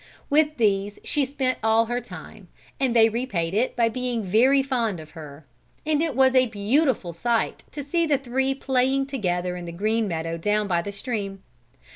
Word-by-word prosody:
With 305 +1 +3
these 205 -2 +1
she 290 -2 0
spent 260 -1 -2
all 220 +1 +3
her 240 +2 -2
time, - - -11 0.3
and 260 -3 +1
they 225 -1 +7
repaid 215 -8 -2
it 230 +5 0
by 235 -1 +3
being 245 -1 -2
very 250 +8 +4
fond 235 -8 -1
of 155 -1 -12
her; 150 -2 -11 0.4
and 305 -1 +1
it 320 -5 -1
was 260 0 +4
a 255 -1 +4
beautiful 220 - 0
sight 230 +6 -1
to 290 - -6
see 335 +4 0
the 290 -2 +3
three 265 +1 -1
playing 265 0 +1
together 180 -9 -2
in 175 -1 -7
the 170 - -6
green 215 +5 0
meadow 165 -1 -3
down 210 +3 0
by 175 -3 +1
the 200 - -6
stream. 200 -3 -5
230 Hz, 185 wpm, -24 LUFS, 195-265 Hz, 0.4 s, they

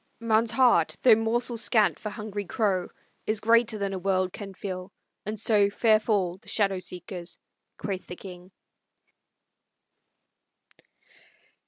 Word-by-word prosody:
"Man's 230 0 +2
heart, 245 +1 +3
though 245 - +8
morsel 230 +2 0
scant 215 - +3
for 215 - -5
hungry 210 -1 -5
crow, 190 -2 0 0.4
Is 215 -1 +1
greater 230 0 +3
than 200 -1 -2
a 190 - -3
world 185 -1 0
can 195 -2 -8
fill, 185 -1 -6 0.4
and 215 0 -3
so 205 -2 +3
Fair 215 +1 +3
fall 195 -5 0
the - - -23
shadow 195 -3 +1
seekers!" 180 0 -7 0.4
quoth 190 -3 -5
the 180 - -7
king. 180 -1 -11
205 Hz, 130 wpm, -27 LUFS, 185-220 Hz, 0.4 s, though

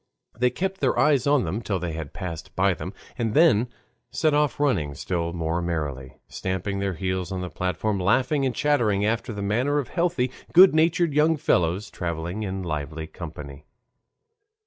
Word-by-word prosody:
They 125 +2 +2
kept 190 +6 -3
their - - +2
eyes 145 -4 +3
on 145 -3 +4
them 95 +8 -3
till 100 -4 -1
they 90 -2 -3
had 80 -2 -6
passed 85 -6 -7
by 95 +1 +3
them, 90 +2 -6 0.3
and 115 -2 -1
then 145 -8 +5 0.4
set 155 -2 +1
off 150 -1 +1
running 90 - +1
still 85 +2 -2
more 85 0 -2
merrily, 75 -6 -4
stamping 95 +1 -3
their 100 -2 -1
heels 95 +2 -2
on 95 -1 -3
the 90 -2 -5
platform, 90 +4 -1
laughing 130 +9 +2
and 130 -2 0
chattering 115 -9 +2
after 115 +2 -1
the 100 -2 -5
manner 125 +8 +1
of 145 - -2
healthy, 170 -8 0 0.2
good 185 0 +8
natured 165 0 +2
young 155 +2 +3
fellows, 90 - +1
traveling 85 +4 -4
in 95 -2 -3
lively 80 -1 -4
company. 75 -4 -9
100 Hz, 170 wpm, -25 LUFS, 85-135 Hz, 0.4 s, good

